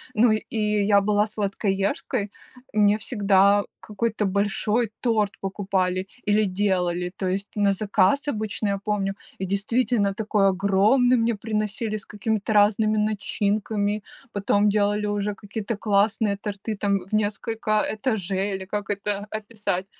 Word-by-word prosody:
Ну, 230 +1 +5
и 215 +1 -3 0.3
я 200 -1 +5
была 205 +1 +2
сладкоежкой, 200 +1 -1 0.4
мне 205 -1 +4
всегда 200 -3 +3 0.2
какой-то 215 0 -2
большой 205 +3 0
торт 220 -4 +1
покупали 190 -1 -1 0.2
или 210 +1 +4
делали, 180 -2 0
то 190 - -2
есть 195 +2 -2
на 205 -1 +3
заказ 205 +7 +2
обычно, 215 -4 -2
я 200 0 0
помню. 200 -2 0 0.3
И - - 0
действительно, 200 +2 +1
такой 210 -1 +1
огромный 200 +7 +3
мне 230 0 +1
приносили, 215 +1 -2
с 210 - -6
какими-то 215 0 -2
разными 215 +1 +3
начинками, 210 0 0 0.3
потом 205 0 +2
делали 205 0 +1
уже 205 0 -1
какие 205 +2 -6
то 220 - -2
классные 205 0 +1
торты, 205 +1 -5
там, 200 0 +1
в 185 +3 -14
несколько 215 +1 -2
этажей 205 -3 0
или 190 0 -6
как 205 +1 -4
это 205 0 -2
описать. 205 -4 -3
205 Hz, 135 wpm, -24 LUFS, 200-215 Hz, 0.4 s, Ну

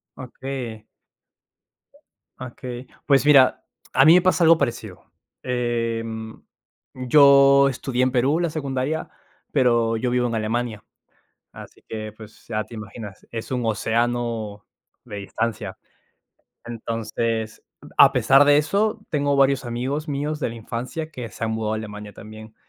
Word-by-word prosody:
Okey. 125 -4 -7 1.6
Okey. 125 0 -8 0.2
Pues 140 0 +3
mira, 135 -3 +5 0.3
a 135 - +5
mí 160 - +8
me 180 - +6
pasa 185 -1 +2
algo 165 0 +6
parecido. 110 - -4 0.4
Em, 115 -2 -3 0.5
yo 140 +1 +6
estudié 125 -1 -3
en 130 - +2
Perú 135 +5 +2
la 170 -2 0
secundaria, 140 0 -3 0.4
pero 120 -4 +2
yo 125 +2 -1
vivo 125 0 +1
en 115 - -3
Alemania, 110 0 -2 0.7
así - - -13
que, 110 -1 -6
pues, 110 0 -15
ya 110 -2 -1
te 115 - -13
imaginas, 110 -2 -9
es 115 -1 -6
un 125 -2 -2
océano 115 -1 -1 0.4
de 105 -4 -8
distancia. 110 +3 -4 0.9
Entonces, 115 -1 -3 0.3
a - - +7
pesar 135 +2 +5
de 145 0 +5
eso, 210 +8 0
tengo 145 -2 +1
varios 135 -1 +3
amigos 130 +6 -3
míos 150 +2 -3
de - - -1
la 115 - -7
infancia 125 +8 -5
que 125 -6 -7
se - - -6
han 110 - -1
mudado 110 -1 -2
a - - -2
Alemania 105 -1 -8
también. 110 0 -12
120 Hz, 140 wpm, -23 LUFS, 110-140 Hz, 1.6 s, mí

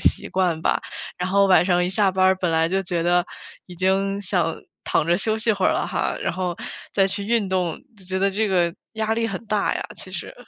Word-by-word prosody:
习 - - +1
惯 180 -4 0
吧。 - - +1 0.4
然 180 +1 -2
后 200 +1 +4
晚 185 -2 +5
上 180 -1 +2
一 - - -1
下 195 0 +3
班 185 0 +1
儿 190 0 +5
本 180 -2 -1
来 160 0 +2
就 195 +1 0
觉 175 -2 -2
得 175 +1 +3 0.4
已 180 - -11
经 195 +2 0
想 175 -4 0 0.3
躺 150 - +1
着 170 - +3
休 215 +3 +2
息 220 0 +3
会 195 -3 +1
儿 - - +3
了 - - -1
哈， - - -1
然 - - -1
后 180 -1 -3 0.4
再 195 -1 +3
去 200 +1 -3
运 220 -2 +1
动， 180 -3 -1 0.2
就 190 - -14
觉 190 +1 -2
得 195 +1 +2
这 210 +2 0
个 175 -3 +1 0.2
压 220 0 -1
力 230 0 0
很 195 +3 -5
大 210 -2 0
呀， - - -2
其 185 - -8
实。 185 - -6
190 Hz, 260 characters per minute, -23 LUFS, 175-200 Hz, 0.4 s, 晚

